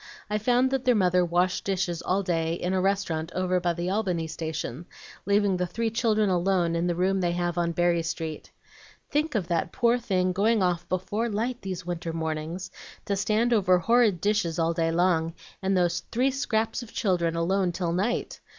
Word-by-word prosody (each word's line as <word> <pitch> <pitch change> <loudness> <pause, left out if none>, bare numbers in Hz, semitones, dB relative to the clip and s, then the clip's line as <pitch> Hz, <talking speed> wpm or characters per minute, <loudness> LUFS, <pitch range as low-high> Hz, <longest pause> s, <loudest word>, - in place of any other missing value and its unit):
I 210 - +1
found 245 +4 +2
that 270 -1 0
their 250 -2 +4
mother 180 -3 +3
washed 175 +2 +1
dishes 185 -3 -1
all 195 +2 0
day 165 -2 0
in 180 +2 -2
a 190 - +1
restaurant 180 -4 -1
over 185 0 +1
by 175 -1 0
the 175 +2 -3
Albany 185 -6 0
Station, 160 -2 -5 0.4
leaving 200 -2 +3
the 180 0 -1
three 225 +6 -2
children 215 -2 +2
alone 180 -2 +1
in 170 +1 0
the 175 - 0
room 190 +2 +1
they 175 -1 +1
have 175 -1 -1
on 170 -1 0
Berry 175 0 +2
Street. 165 -1 -5 0.6
Think 295 -1 0
of 190 -6 0
that 170 0 0
poor 240 +1 +2
thing 185 -5 0
going 205 +3 +2
off 175 -2 -1
before 205 +5 -1
light 235 +4 -2
these 185 -2 -5
winter 170 -2 -4
mornings 160 +3 -4 0.3
to 200 - 0
stand 220 +4 +1
over 185 -5 +4
horrid 220 -1 +3
dishes 205 -6 0
all 165 0 +1
day 165 -1 0
long, 165 -1 +1 0.3
and 190 0 +1
those 175 -1 +2
three 255 +3 +2
scraps 225 -4 -1
of 240 - -10
children 175 -5 0
alone 180 +2 +1
till 170 -1 -2
night! 205 +7 -1
185 Hz, 190 wpm, -26 LUFS, 170-210 Hz, 0.6 s, their